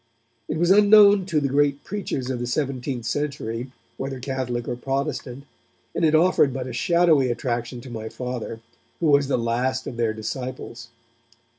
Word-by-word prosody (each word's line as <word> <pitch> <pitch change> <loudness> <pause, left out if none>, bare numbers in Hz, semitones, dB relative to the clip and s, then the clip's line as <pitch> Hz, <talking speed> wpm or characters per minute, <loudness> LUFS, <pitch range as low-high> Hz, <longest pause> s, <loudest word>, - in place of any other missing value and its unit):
It - - -2
was 175 +3 +3
unknown 205 -1 +7
to 160 -5 +1
the 140 - 0
great 140 +1 +1
preachers 160 -10 -3
of 125 - -3
the 120 - -3
seventeenth 130 -2 -2
century, 125 -3 -3 0.3
whether 135 -1 -4
Catholic 125 -2 -3
or - - -2
Protestant, 135 0 -3 0.5
and - - -2
it 160 -1 +4
offered 160 -4 +4
but 130 -1 -4
a 130 - -6
shadowy 165 -2 +3
attraction 120 0 -3
to 130 - -10
my 110 -1 -5
Father, 120 -1 -5 0.4
who - - -1
was 140 -1 +4
the 140 - +1
last 125 +3 -1
of 120 - -6
their 115 -2 0
disciples. 120 +1 -6
130 Hz, 165 wpm, -24 LUFS, 120-145 Hz, 0.5 s, unknown